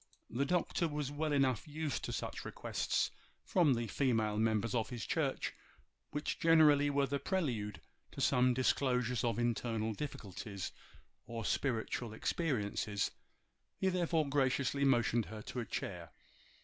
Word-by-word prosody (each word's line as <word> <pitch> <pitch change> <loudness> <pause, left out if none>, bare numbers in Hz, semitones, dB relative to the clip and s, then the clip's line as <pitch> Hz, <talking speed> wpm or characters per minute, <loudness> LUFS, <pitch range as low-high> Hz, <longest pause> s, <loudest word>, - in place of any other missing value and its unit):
The 135 +5 +1
Doctor 170 +1 +1
was 145 -2 -3
well 150 +1 -1
enough 135 -4 +2
used 150 -2 -3
to - - -3
such - - -4
requests - - -1 0.3
from 160 -8 +4
the 115 0 -1
female 110 -4 +1
members 110 0 +1
of 115 -3 0
his 120 -4 -5
church, - - -1 0.6
which 150 +1 -3
generally 150 -3 +6
were 140 0 +2
the 140 +1 -2
prelude 120 - -1 0.3
to - - -8
some 125 0 +4
disclosures 125 -1 +1
of 115 -2 +1
internal 115 -2 0
difficulties 100 -6 -5 0.6
or 115 -2 -4
spiritual 115 -3 -1
experiences. 105 -7 -1 0.7
He 190 - +2
therefore 170 -4 +1
graciously 140 0 +1
motioned 120 -3 +3
her 110 -1 -8
to 125 - -5
a 120 - -2
chair. - - -4
125 Hz, 135 wpm, -35 LUFS, 115-145 Hz, 0.7 s, generally